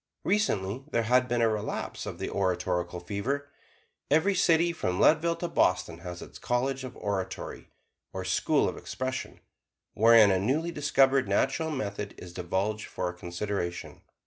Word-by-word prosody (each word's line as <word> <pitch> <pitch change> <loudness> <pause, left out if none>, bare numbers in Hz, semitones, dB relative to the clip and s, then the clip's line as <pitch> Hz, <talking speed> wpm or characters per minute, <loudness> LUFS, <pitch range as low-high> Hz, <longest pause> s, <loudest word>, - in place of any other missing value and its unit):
Recently, 130 - 0
there 115 -5 +1
has 125 +3 +3
been 120 -1 0
a - - +5
relapse 110 -1 -3
of - - -5
the - - -3
oratorical 90 -2 -1
fever. 130 +10 -3 0.6
Every 160 +7 +3
city 170 -2 +3
from 90 - -2
Leadville 165 +2 +4
to 175 - -3
Boston 90 - +1
has 90 0 -7
its - - -12
College 130 +2 -1
of 130 - -8
Oratory, 100 -2 -4 0.4
or - - -5
School - - +2
of - - -4
Expression, 130 +5 -5 0.5
wherein 115 -1 +7
a 95 - +2
newly 145 - 0
discovered 135 -3 +3
"Natural 160 +4 +1
Method" 105 -8 -4
is 90 -1 -10
divulged 95 +4 -2
for 90 - -3
a - - -6
consideration. 90 0 -4
110 Hz, 150 wpm, -28 LUFS, 95-140 Hz, 0.6 s, wherein